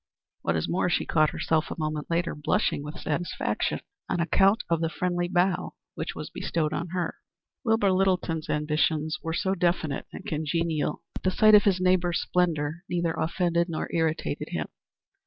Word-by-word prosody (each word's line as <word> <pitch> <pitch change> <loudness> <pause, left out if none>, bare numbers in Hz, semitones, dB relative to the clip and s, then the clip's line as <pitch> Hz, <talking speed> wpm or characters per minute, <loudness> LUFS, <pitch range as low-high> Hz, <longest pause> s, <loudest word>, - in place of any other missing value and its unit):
What 85 - 0
is 80 - 0
more 180 0 +1
she - - +1
caught 155 -2 +3
herself 160 -1 0
a - - -5
moment 155 -2 -3
later 170 +1 0
blushing 150 -1 0
with 150 +2 -7
satisfaction 160 +3 -2 0.3
on 175 - 0
account 195 +6 +3
of 165 -1 +1
the 165 - +1
friendly 175 0 -1
bow 180 +1 +1 0.2
which - - -4
was - - -6
bestowed 155 -2 -1
on 170 - -2
her. 175 -1 -3 0.5
Wilbur 225 -5 +3
Littleton's 185 -4 +1
ambitions 150 +1 0
were 165 0 -2
so 190 +2 +1
definite 170 -5 0
and - - -9
congenial 155 0 -1
that - - -7
the 185 - +2
sight 215 +3 +5
of 210 - +8
his 190 -3 +3
neighbors' 185 -2 +2
splendor 165 -2 0
neither 170 -2 0
offended 170 +1 0
nor 160 - -3
irritated 160 -1 -1
him. - - -3
170 Hz, 170 wpm, -27 LUFS, 155-180 Hz, 0.5 s, of